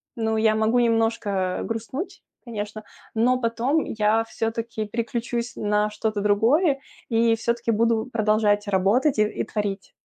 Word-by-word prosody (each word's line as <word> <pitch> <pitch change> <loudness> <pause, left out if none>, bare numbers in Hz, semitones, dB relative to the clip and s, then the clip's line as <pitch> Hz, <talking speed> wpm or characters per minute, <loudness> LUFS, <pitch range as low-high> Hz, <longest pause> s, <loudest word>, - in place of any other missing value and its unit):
ну, 220 -1 0
я 220 0 +3
могу 220 +3 +2
немножко 225 -5 +1
взгрустнуть, 230 - -5 0.2
конечно, 215 -2 -5 0.3
но 250 +3 +3
потом 240 +7 +1
я 220 +1 +1
всё-таки 225 -1 -3
переключусь 235 +2 -3
на 210 0 +1
что-то 210 0 -2
другое 260 - +3 0.3
и 230 -1 +3
всё-таки 235 +1 -1
буду 225 0 +2
продолжать 215 -1 +2
работать 200 +9 +2
и - - +6
и 210 - -2
творить. 205 -3 -4
225 Hz, 130 wpm, -24 LUFS, 210-235 Hz, 0.3 s, и